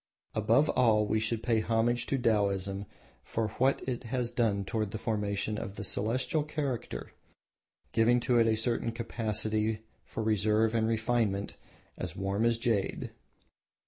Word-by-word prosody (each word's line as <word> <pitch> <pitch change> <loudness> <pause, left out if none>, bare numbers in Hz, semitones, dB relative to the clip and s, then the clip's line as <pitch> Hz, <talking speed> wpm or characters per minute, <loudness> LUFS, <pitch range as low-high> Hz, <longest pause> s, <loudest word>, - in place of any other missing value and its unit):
Above 115 +7 +3
all 110 -4 +4
we 110 +1 +1
should 110 +1 -1
pay 115 -2 +2
homage 115 +2 +1
to 135 - +1
Taoism 100 -4 0 0.4
for 110 -1 -2
what 130 +1 +2
it 125 -1 -3
has 120 0 -1
done 110 -5 +1
toward 110 0 -1
the 110 - -4
formation 105 -1 -1
of 95 - -6
the 105 - -5
Celestial 120 - 0
character, 140 - -4 0.8
giving 120 +2 +4
to 120 0 +3
it 115 - +4
a 110 -1 +2
certain 115 +1 0
capacity 110 -2 -1 0.2
for 110 - -5
reserve 110 +1 +2
and 110 -1 +2
refinement 110 -3 0 0.5
as 90 -1 -4
"warm 100 +3 0
as 115 -1 +3
jade." 115 -5 -1
110 Hz, 145 wpm, -30 LUFS, 105-120 Hz, 0.8 s, all